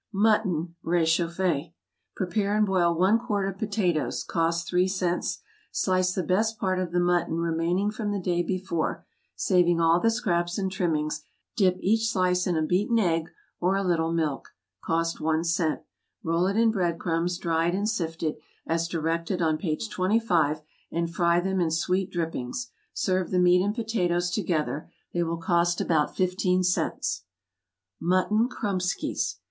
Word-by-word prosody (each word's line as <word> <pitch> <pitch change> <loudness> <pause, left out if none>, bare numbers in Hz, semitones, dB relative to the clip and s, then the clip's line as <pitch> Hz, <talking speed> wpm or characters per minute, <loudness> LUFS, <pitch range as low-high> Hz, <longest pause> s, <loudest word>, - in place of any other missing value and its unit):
=Mutton= 195 -5 +1
rechauffée. 170 -1 +1 0.4
Prepare 200 +3 0
and 215 - +4
boil 175 -3 +2
one 195 +6 +4
quart 205 -4 -1
of 195 -1 -5
potatoes, 195 -7 0
(cost 170 0 0
three 180 0 +2
cents;) 185 -2 -1 0.3
slice 185 -1 +1
the 185 - 0
best 215 +7 +1
part 185 -2 0
of 180 -2 -2
the 175 - +1
mutton 175 -2 +1
remaining 170 +4 0
from 215 -1 -3
the 205 - -1
day 175 -1 0
before, 180 -2 -2 0.3
saving 175 -2 +3
all 165 +1 +4
the 225 - +3
scraps 175 -7 0
and 190 -2 -1
trimmings, 165 -6 -1 0.3
dip 185 -4 +3
each 225 +3 +2
slice 180 -3 +1
in 175 -3 +1
a 155 - +1
beaten 195 +8 +1
egg, 165 -6 +1 0.3
or 185 +2 +2
a 195 - 0
little 165 -3 +1
milk, 155 -4 -2 0.3
(cost 165 0 -1
one 160 +1 +1
cent,) 170 -2 0 0.4
roll 165 +2 +1
it 200 +2 0
in 230 0 +4
bread 175 -5 0
crumbs, 170 +1 -1
dried 170 0 0
and 205 +2 0
sifted, 165 -6 -2 0.3
as 165 +1 0
directed 165 +2 -1
on 160 -2 +2
page 155 +5 -2
25, 185 -7 +1 0.3
and 170 0 -2
fry 170 0 +3
them 190 +1 0
in 165 - +2
sweet 180 +4 0
drippings. 170 - -4 0.2
Serve 185 -2 0
the 185 - 0
meat 180 0 +5
and 205 +3 0
potatoes 180 -7 0
together; 160 -6 -2 0.2
they 175 - 0
will 170 0 -1
cost 170 +1 +1
about 155 -3 +1
fifteen 185 0 +1
cents. 180 0 -1 0.8
=Mutton 185 +7 +2
Kromeskys. 190 -6 -2
180 Hz, 155 wpm, -26 LUFS, 165-190 Hz, 0.8 s, meat